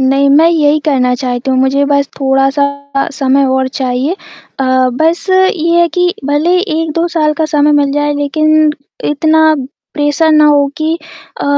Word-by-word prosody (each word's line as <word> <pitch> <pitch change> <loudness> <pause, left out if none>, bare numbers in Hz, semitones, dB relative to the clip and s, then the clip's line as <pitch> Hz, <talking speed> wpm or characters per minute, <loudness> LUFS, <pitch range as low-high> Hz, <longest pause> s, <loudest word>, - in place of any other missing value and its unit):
नहीं, 275 +1 +2
मैं 310 +4 +5
यही 305 -3 +2
करना 255 -5 +1
चाहती 250 +1 -3
हूँ। 260 - +1
मुझे 265 +2 +1
बस 280 0 +1
थोड़ा-सा 275 +1 -1
समय 275 -1 +1
और 260 0 0
चाहिए। 260 +3 -2 0.5
अ, - - 0 0.3
बस 325 +7 -1
ये 350 -3 +2
है 340 - +2
कि 355 0 +1
भले 300 +5 +1
1-2 325 -2 -2
साल 310 -3 0
का - - +2
समय 300 -1 +1
मिल 285 -1 +1
जाए 295 0 -1
लेकिन 310 +2 +1 0.3
इतना 315 +1 +2 0.4
प्रेशर 295 +2 +1
ना 305 0 +4
हो 290 -1 +3
कि 315 +1 -1 0.5
अ, - - -3
290 Hz, 160 wpm, -12 LUFS, 275-315 Hz, 0.5 s, मैं